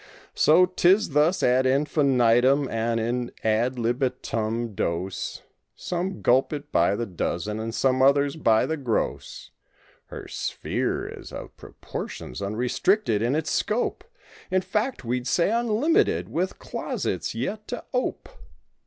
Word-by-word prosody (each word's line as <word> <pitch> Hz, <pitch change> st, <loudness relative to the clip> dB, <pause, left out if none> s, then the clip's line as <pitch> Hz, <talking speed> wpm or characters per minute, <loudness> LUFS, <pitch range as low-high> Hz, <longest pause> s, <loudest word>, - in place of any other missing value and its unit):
So 170 Hz, +4 st, +5 dB
'tis 185 Hz, +3 st, +3 dB
thus 150 Hz, +5 st, +2 dB
ad 130 Hz, +1 st, +3 dB
infinitum 135 Hz, -1 st, +3 dB
and 115 Hz, +1 st, 0 dB
in 120 Hz, +2 st, -2 dB
ad 115 Hz, +4 st, +1 dB
libitum 120 Hz, -2 st, -1 dB
dose— 95 Hz, +2 st, -3 dB, 0.3 s
Some 180 Hz, +2 st, -4 dB
gulp 130 Hz, +2 st, +3 dB
it 145 Hz, 0 st, -6 dB
by 85 Hz, +4 st, +3 dB
the 120 Hz, -, -2 dB
dozen 100 Hz, +2 st, -3 dB
and 115 Hz, +1 st, -3 dB
some 130 Hz, +2 st, +1 dB
others 140 Hz, +1 st, +4 dB
by 115 Hz, -8 st, +3 dB
the 160 Hz, -, -2 dB
gross. 125 Hz, -6 st, -3 dB, 0.6 s
Her -, -, -8 dB
sphere -, -, -2 dB
is -, -, -9 dB
of -, -, -8 dB
proportions, 60 Hz, -, -7 dB
unrestricted 125 Hz, -, +1 dB
in 120 Hz, +5 st, +1 dB
its 160 Hz, -, -1 dB
scope. 220 Hz, +3 st, -1 dB, 0.5 s
In 185 Hz, 0 st, +2 dB
fact 215 Hz, -, -2 dB
we'd 125 Hz, +2 st, -2 dB
say 175 Hz, +8 st, +2 dB
unlimited" 240 Hz, -, +2 dB
with -, -, -2 dB
closets -, -, -3 dB
yet 215 Hz, 0 st, -4 dB
to 245 Hz, -, -5 dB
ope. 250 Hz, 0 st, -2 dB
130 Hz, 130 wpm, -25 LUFS, 115-175 Hz, 0.6 s, So